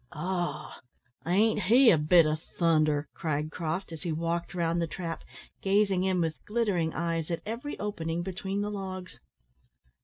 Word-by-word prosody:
"Oh! 175 +3 -3 0.5
ain't 210 +4 +3
he 235 +6 +6
a 165 - +5
bit 160 +2 +6
o' 155 0 +1 0.2
thunder?" 155 -3 +3
cried 155 -1 -2
Croft, 170 +3 -3
as 160 - -7
he 170 - -2
walked 170 +3 -2
round 170 -1 +1
the 165 - 0
trap, 165 -1 -5 0.4
gazing 195 -1 +2
in 185 -2 +2
with 160 -1 -2
glittering 205 -8 +1
eyes 165 -1 -2
at 170 - -3
every 235 +7 -4
opening 170 -5 -3
between 190 +2 -3
the 205 0 -2
logs. 185 -2 -6
175 Hz, 155 wpm, -29 LUFS, 165-195 Hz, 0.5 s, he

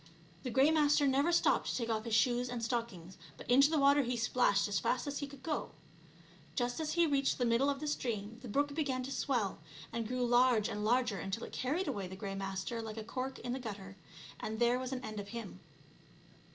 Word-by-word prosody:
The 255 - -4
Grey 265 +5 +4
Master 295 -2 +4
never 275 +5 +3
stopped 340 - +3
to - - -1
take 235 -2 -1
off 220 0 -1
his 230 -2 0
shoes 245 +1 +2
and 240 -1 -4
stockings, 200 -7 -4 0.2
but - - -11
into 275 +4 +6
the 320 - +1
water 280 0 +5
he 245 -2 -2
splashed 220 -3 +2
as 200 -1 0
fast 255 - 0
as 285 -1 -3
he 285 - -3
could 280 -1 -13
go. 310 -2 -3 0.8
Just 245 0 -1
as 310 -1 -2
he 340 0 +4
reached 280 -3 +1
the 245 - +1
middle 235 +4 +3
of 280 -1 -1
the 305 - -4
stream 230 -6 -3
the 255 - -8
brook 285 +6 0
began 275 -4 -1
to 265 - -5
swell, 240 -8 -1 0.3
and 230 -1 -2
grew 250 +1 -1
large 240 -3 +4
and 210 - -3
larger 240 -2 +2
until 195 +4 -4
it - - -7
carried 305 +9 -1
away 195 -3 -2
the 190 - -8
Grey 195 0 -5
Master 195 +4 -3
like 220 0 -7
a 220 - -4
cork 255 +4 -4
in 245 0 -4
the 260 - -3
gutter, 200 -5 -7 0.4
and 220 0 -4
there 240 +2 +3
was 255 0 -4
an 255 -1 -4
end 215 -1 -5
of 200 - -6
him. 230 +2 -7
245 Hz, 230 wpm, -34 LUFS, 220-275 Hz, 0.8 s, into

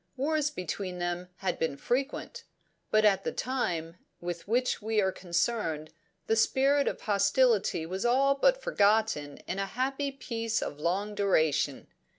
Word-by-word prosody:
Wars 300 +2 +1
between 185 - -4
them 175 0 -3
had 190 +1 -3
been 160 -4 -1
frequent, 275 - -2 0.5
but 215 0 +4
at 200 -2 +4
the - - -1
time 175 -10 -2 0.2
with 175 0 -5
which 245 +3 +1
we 220 +1 0
are 190 -2 +2
concerned 170 -4 -1 0.3
the 225 - +2
spirit 275 +5 +3
of - - -2
hostility 205 -2 +2
was 185 +3 -4
all 265 +3 +4
but - - +3
forgotten 205 -8 +2
in 190 - -3
a 195 - -1
happy 270 +5 -2
peace 230 -4 -2
of 145 - -5
long 195 +6 -1
duration. 160 -8 +1
210 Hz, 150 wpm, -29 LUFS, 175-255 Hz, 0.5 s, but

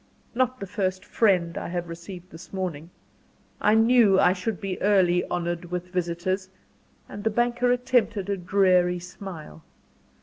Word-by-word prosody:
"Not 255 +1 0
the 195 - -5
first 185 -1 -2
'friend' 185 -4 +1
I - - -5
have 175 0 -3
received 175 +2 -9
this 165 +3 -12
morning. 175 -5 -4 0.7
I 210 +1 +4
knew 225 -4 +5
I 180 - +5
should 185 +1 -3
be 195 -2 -4
early 185 -3 +3
honoured 175 0 -2
with 180 +1 -5
visitors;" 180 +2 -2 0.6
and 205 - -8
the 220 - +2
banker 240 +2 +1
attempted 245 -5 +1
a 200 - 0
dreary 180 -1 +2
smile. 175 - -9
185 Hz, 145 wpm, -25 LUFS, 175-205 Hz, 0.7 s, knew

